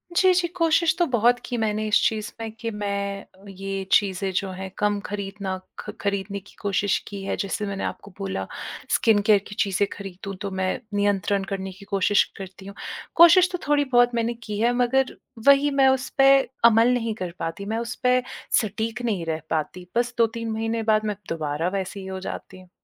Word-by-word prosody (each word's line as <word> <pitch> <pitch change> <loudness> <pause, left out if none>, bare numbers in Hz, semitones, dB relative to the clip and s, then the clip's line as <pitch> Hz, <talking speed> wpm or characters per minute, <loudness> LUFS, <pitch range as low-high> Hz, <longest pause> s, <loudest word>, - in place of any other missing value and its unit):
जी, 370 0 +5
जी, 350 -1 +2
कोशिश 330 -1 +3
तो 345 - +4
बहुत 245 -1 +3
की 245 - -3
मैंने 215 -1 0
इस 210 - +4
चीज़ 215 -1 -3
में 225 -1 -4
कि 230 - -3
मैं 200 -1 -3
अ, 190 +2 -22
ये 195 0 -5
चीज़ें 195 -1 +2
जो 195 0 0
हैं 190 +1 -6
कम 205 -1 +1
खरीदना 195 -1 -4 0.2
ख - - -7
खरीदने 200 0 -2
की 200 - -19
कोशिश 200 0 +1
की 200 -1 -6
है, - - -2
जैसे 200 +1 -2
मैंने 195 -1 -4
आपको 200 - -5
बोला 190 - -3 0.4
स्किन 220 -2 +4
केयर 210 0 +5
की 205 - -9
चीज़ें 200 0 +2
खरीदूँ 195 0 -7
तो 200 - -3
मैं 190 0 -1
नियंत्रण 200 -1 +1
करने 190 -1 -4
की 200 +2 -14
कोशिश 200 +1 +3
करती 190 0 -9
हूँ। 200 0 -9 0.4
कोशिश 345 +2 +8
तो 360 - -2
थोड़ी 290 -1 +3
बहुत 245 0 +5
मैंने 235 0 0
की 210 -1 -4
है 240 +2 +3
मगर 255 +2 +2 0.3
वही 280 +1 +6
मैं 270 -1 +4
उस 265 0 0
पे 270 0 +7 0.3
अमल 235 +2 +6
नहीं 230 -2 -1
कर 180 -5 -4
पाती, 165 +4 -4
मैं 220 +2 -2
उस 235 +1 -3
पे 250 0 +4 0.4
सटीक 220 +2 -3
नहीं 195 -7 -1
रह 160 -1 -2
पाती, 180 +3 -3
बस 240 +1 +1
2-3 230 0 0
महीने 225 +1 -1
बाद 215 0 +2
मैं 210 - -1
दोबारा 155 0 -2
वैसी 195 0 -4
ही 190 - -8
हो 190 0 -5
जाती 185 0 -7
हूँ। 180 - -18
205 Hz, 200 wpm, -24 LUFS, 195-235 Hz, 0.4 s, कोशिश